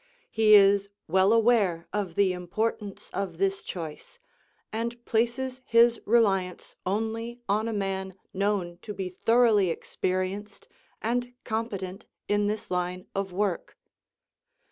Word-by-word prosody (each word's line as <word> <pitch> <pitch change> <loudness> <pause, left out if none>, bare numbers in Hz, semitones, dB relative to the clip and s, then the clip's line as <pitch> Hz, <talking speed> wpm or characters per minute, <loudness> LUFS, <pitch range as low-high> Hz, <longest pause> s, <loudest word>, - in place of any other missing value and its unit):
He 215 -1 +6
is 200 0 +5 0.2
well 190 +4 +4
aware 220 -7 +3
of 200 -5 -2
the 195 -2 +3
importance 200 +3 -3
of 190 -4 -3
this 195 +1 0
choice, 165 - -7 0.6
and 235 +2 -4
places 250 +3 0
his 235 -1 +4
reliance 195 -5 +1
only 225 +4 -2
on 210 +3 +1
a - - -1
man 190 -2 -3 0.2
known 190 -3 -1
to 210 - -7
be 185 -1 -3
thoroughly 220 0 +3
experienced 185 +4 -3 0.4
and 245 +2 -1
competent 200 -4 -4 0.2
in 205 0 +2
this 210 -1 -3
line 180 0 -2
of 195 -1 -2
work. 190 -1 -2
205 Hz, 120 wpm, -27 LUFS, 185-225 Hz, 0.6 s, He